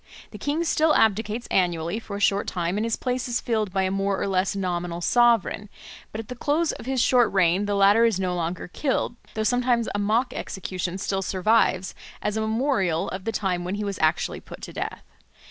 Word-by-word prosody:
The - - -9
king 295 +4 -1
still 315 -1 +3
abdicates 220 +2 +1
annually 175 +1 +1
for 210 -3 -7
a - - -4
short 200 0 +2
time 175 0 -1
and 210 - 0
his 230 -1 0
place 250 0 -2
is 240 0 0
filled 220 -4 -1
by 190 +1 +1
a 185 - 0
more 195 0 0
or - - -1
less 190 0 +1
nominal 175 -3 -2
sovereign; 230 0 +2 0.4
but - - -6
at 225 - -6
the 250 - -6
close 300 +6 +1
of - - -9
his 265 -1 0
short 245 0 +4
reign 190 +1 +2
the 205 - 0
latter 200 +3 +5
is 225 -5 +2
no 185 -1 0
longer 175 0 -3
killed, 255 +3 -1 0.2
though 220 - 0
sometimes 245 0 +2
a 205 - -1
mock 220 +5 +1
execution 185 -1 -4
still 195 0 -2
survives 190 -1 +2 0.3
as 210 0 -2
a 220 - 0
memorial 220 - 0
of 185 0 -6
the 225 - 0
time 185 -5 -1
when 180 +3 -3
he 210 - -3
was 200 -2 -4
actually 160 +1 +1
put - - -12
to - - -7
death. - - -5
205 Hz, 215 wpm, -25 LUFS, 185-230 Hz, 0.4 s, latter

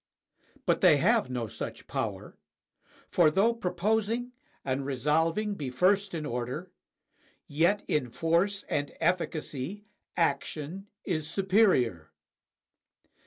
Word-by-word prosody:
But - - +2
they - - +7
have - - +3
no 125 -2 -2
such 110 - -6
power; - - -4 0.8
for 170 -3 +5
though 200 +9 +3
proposing 220 +5 -1 0.3
and 135 0 -1
resolving 160 - +1
be 145 -9 -4
first 190 +8 +2
in 155 -2 -3
order, 125 +8 -4 0.8
yet 170 +8 +2
in 130 -5 0
force 170 - +1
and 145 0 -1
efficacy 175 +1 -2 0.3
action 165 +4 -1 0.2
is 155 -4 -1
superior. 185 - +2
165 Hz, 105 wpm, -29 LUFS, 140-200 Hz, 0.8 s, they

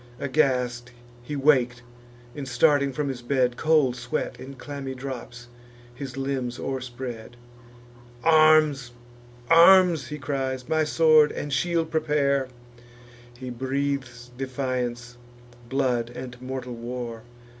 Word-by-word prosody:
Aghast 125 -4 0 0.3
he 135 +5 -6
wak'd; 130 -4 +2 0.5
and, 140 -2 -6
starting 140 +2 +3
from 145 +2 -3
his 130 -2 -4
bed, 125 -1 +1
Cold 150 -5 +2
sweat, 120 -1 -4
in 135 +1 -9
clammy 135 0 -7
drops, 125 -2 -8 0.5
his 135 +1 -8
limbs 135 -3 -3
o'erspread. 125 -3 -6 0.9
"Arms! 155 -5 +4 0.5
arms!" 170 -3 +6
he 150 - -6
cries: 130 -2 -3
"my 160 -1 +2
sword 155 -1 +4
and 145 -1 -5
shield 165 +3 0
prepare!" 145 -4 +1 0.9
He 130 0 -7
breathes 130 -1 -3
defiance, 125 -2 -4 0.5
blood, 125 -3 0
and 125 0 -8
mortal 130 -1 -5
war. 120 -1 -6
130 Hz, 110 wpm, -25 LUFS, 125-145 Hz, 0.9 s, arms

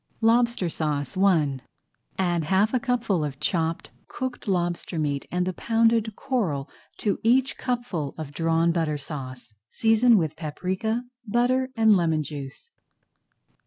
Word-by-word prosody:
LOBSTER 235 -3 +3
SAUCE 150 -4 -2
I 165 -8 +2 0.6
Add 175 -4 0
half 195 - +2
a 255 - +3
cupful 235 - 0
of 140 -2 -4
chopped 165 +1 -1 0.2
cooked 255 -3 -5
lobster 175 -2 -1
[Page 160 - 0
29] 145 -2 +1
meat 140 - -6
and 180 0 0
the 185 - -2
pounded 225 +1 +2
coral 175 - -1 0.3
to 205 - -1
each 255 +3 +3
cupful 240 - -3
of 155 -3 -7
Drawn 165 +1 +2
Butter 160 -3 0
Sauce. 130 -5 -8 0.2
Season 225 +1 +4
with 160 -4 -1
paprika, 185 +9 -2 0.2
butter, 250 +4 +2
and 220 -2 +5
lemon 160 -4 +1
juice. 145 - -8
180 Hz, 140 wpm, -25 LUFS, 155-230 Hz, 0.6 s, and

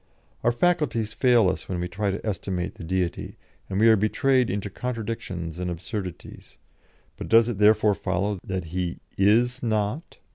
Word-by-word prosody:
Our 120 - +4
faculties 120 -7 0
fail 120 -5 +4
us 90 - -3
when 90 -2 -2
we 90 - -2
try 100 +3 -2
to 95 +3 -4
estimate 95 -3 -3
the - - -11
Deity, 90 +1 -2 0.3
and 95 - -1
we 115 - +5
are 110 - +7
betrayed 125 +5 +2
into 100 0 -3
contradictions 100 -9 -5
and 90 0 -2
absurdities; 90 +1 -7 0.6
but - - -7
does 115 0 +6
it 110 -4 -4
therefore 105 0 +5
follow 100 +1 -2
that 95 -1 -3
He 90 -2 -2 0.2
is 120 +6 +3
not? 110 +7 -2
105 Hz, 160 wpm, -25 LUFS, 95-115 Hz, 0.6 s, are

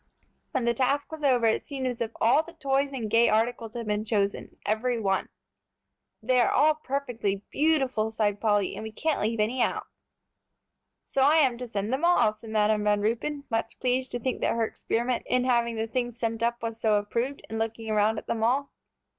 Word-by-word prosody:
When 260 -3 -1
the 235 - +3
task 270 +5 0
was 315 -1 -7
over, 250 -4 +3
it 220 - +2
seemed 275 -3 -5
as 245 -2 -3
if 230 - 0
all 240 +7 +4
the 340 +1 -13
toys 275 0 0
and 245 -5 -3
gay 230 +2 +4
articles 225 +1 0
had 235 -1 -4
been 210 0 -1
chosen, 205 -2 -1
every 230 +3 0
one! 195 -3 0 0.9
"They 250 +2 +3
are 240 - +4
all 310 +1 +4
perfectly 245 -9 -3
beautiful," 270 -8 +1
sighed 210 -2 -1
Polly, 205 -3 +2
"and - - -6
we 220 0 -6
can't 310 +7 -1
leave 220 +1 -1
any 235 +4 +1
out." - - 0 1.2
"So 270 - -1
I 290 +4 +5
am 270 -6 +4
to 250 - -5
send 210 +1 -3
them 270 +5 -1
all," 340 -11 +4
said 220 +1 -13
Madam 215 -1 +2
Van 210 0 +2
Ruypen, 260 +7 -1
much 225 - -2
pleased 255 0 0
to 245 - -2
think 255 +2 -2
that - - +1
her 230 -1 +1
experiment 235 +2 -2
in 250 0 +2
having 235 -2 +1
the 220 0 -1
things 240 +1 -3
sent 230 -1 -2
up 235 0 -1
was 225 0 -4
so 215 -2 +3
approved, 235 +7 -2
and 225 - -4
looking 225 0 -3
around 215 0 +2
at - - -6
them 225 -1 -2
all. 270 +5 +1
235 Hz, 205 wpm, -27 LUFS, 220-260 Hz, 1.2 s, I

